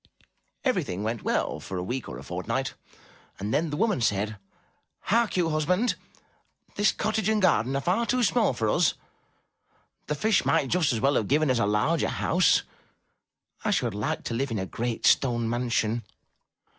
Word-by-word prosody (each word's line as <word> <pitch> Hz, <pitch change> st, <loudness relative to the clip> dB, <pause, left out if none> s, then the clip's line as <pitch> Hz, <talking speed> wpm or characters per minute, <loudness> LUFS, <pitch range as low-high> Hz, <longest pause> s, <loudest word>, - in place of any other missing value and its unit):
Everything 95 Hz, +3 st, 0 dB
went 115 Hz, +1 st, -2 dB
well -, -, -1 dB
for 95 Hz, -, -6 dB
a 90 Hz, -, -2 dB
week 125 Hz, +6 st, -4 dB
or 60 Hz, -, -7 dB
a 65 Hz, -, -9 dB
fortnight, -, -, -3 dB, 0.6 s
and 105 Hz, +2 st, -3 dB
then 165 Hz, +1 st, +1 dB
the 145 Hz, -, -3 dB
woman 215 Hz, -, +1 dB
said: 105 Hz, -1 st, 0 dB, 0.6 s
"Hark 230 Hz, -1 st, +1 dB
you, 170 Hz, -2 st, +2 dB
husband, 180 Hz, +10 st, +1 dB, 0.8 s
this 205 Hz, +1 st, +3 dB
cottage 215 Hz, 0 st, -1 dB
and 220 Hz, -1 st, +2 dB
garden 135 Hz, -, +2 dB
are 140 Hz, -, 0 dB
far 195 Hz, +7 st, +1 dB
too 250 Hz, -1 st, +1 dB
small 225 Hz, -, +2 dB
for 115 Hz, -2 st, -1 dB
us; -, -, +2 dB, 1.1 s
the 150 Hz, -, -1 dB
Fish 215 Hz, +8 st, +2 dB
might 135 Hz, 0 st, +2 dB
just 175 Hz, -5 st, +2 dB
as 115 Hz, -, -1 dB
well 140 Hz, +5 st, +2 dB
have 110 Hz, -, +1 dB
given 150 Hz, 0 st, +3 dB
us 125 Hz, -, +1 dB
a 100 Hz, -, +2 dB
larger 125 Hz, +10 st, +1 dB
house. 180 Hz, +2 st, +2 dB, 1.0 s
I 220 Hz, -, 0 dB
should 125 Hz, -, +1 dB
like 105 Hz, +2 st, -2 dB
to -, -, -4 dB
live 135 Hz, +4 st, -1 dB
in 115 Hz, -, -2 dB
a 95 Hz, -, -2 dB
great 115 Hz, +3 st, -3 dB
stone 120 Hz, -3 st, +3 dB
mansion. 120 Hz, -1 st, 0 dB
135 Hz, 175 wpm, -26 LUFS, 110-180 Hz, 1.1 s, this